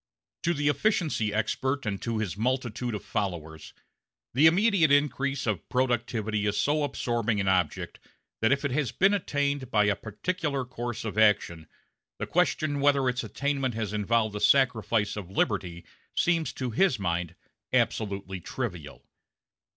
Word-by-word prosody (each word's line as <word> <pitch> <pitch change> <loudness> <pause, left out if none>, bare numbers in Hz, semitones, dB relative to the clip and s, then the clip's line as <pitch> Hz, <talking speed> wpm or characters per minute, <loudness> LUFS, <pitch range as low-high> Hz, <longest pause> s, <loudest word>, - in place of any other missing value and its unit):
To 170 +1 +1
the 145 0 0
efficiency 150 - +1
expert 130 +6 -1
and 100 -2 -3
to 115 -1 -2
his 105 -5 -2
multitude 120 0 -1
of 105 - -7
followers, 80 -6 -4 0.6
the 145 +6 +6
immediate 180 -2 +4
increase 140 -1 +1
of 105 -7 -2
productivity 115 -4 0
is 105 - 0
so 150 +1 +2
absorbing 120 -6 -1
an 95 - -1
object 90 -4 0 0.4
that 110 - +3
if 140 +1 +1
it 140 - 0
has 135 -3 0
been 195 +2 +3
attained 145 -8 -1
by 105 -4 +3
a 105 -1 +2
particular 140 - -3
course 120 -2 -5
of 110 0 -2
action, 100 -7 +2 0.5
the - - -3
question 155 -4 +1
whether 140 -2 +3
its 125 +1 0
attainment 140 -4 -2
has 110 -2 -3
involved 110 0 +1
a - - -2
sacrifice 115 -5 +2
of 100 -4 -6
liberty 95 -3 -1 0.3
seems 165 -2 +1
to 130 -2 -3
his 140 - +2
mind 85 -3 -2 0.4
absolutely 100 -3 -1
trivial. 90 - -6
120 Hz, 150 wpm, -27 LUFS, 105-140 Hz, 0.6 s, the